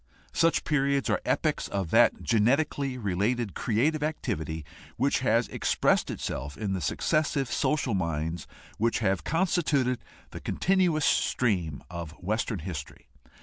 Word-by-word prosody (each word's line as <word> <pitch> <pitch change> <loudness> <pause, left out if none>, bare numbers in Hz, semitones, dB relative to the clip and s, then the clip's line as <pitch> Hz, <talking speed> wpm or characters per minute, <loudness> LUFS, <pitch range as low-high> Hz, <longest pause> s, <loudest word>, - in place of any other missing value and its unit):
Such 165 0 +3
periods 140 -2 +1
are - - +1
epochs - - 0
of 95 -5 -3
that 115 +1 +4
genetically 135 +4 +1
related 105 +1 -1
creative 140 +8 +1
activity 85 - -3 0.3
which 135 +4 +2
has 115 -2 +2
expressed - - +1
itself 70 0 -4
in 100 -2 -2
the 95 - -2
successive 140 - 0
social 145 -6 +1
minds 85 -2 -2 0.3
which 115 +2 +2
have 95 -4 0
constituted 155 -7 +1 0.3
the - - -7
continuous 180 -5 +2
stream 90 - +1
of 85 -3 -6
Western 105 +5 -2
history. 75 -7 -7
115 Hz, 125 wpm, -28 LUFS, 95-140 Hz, 0.3 s, that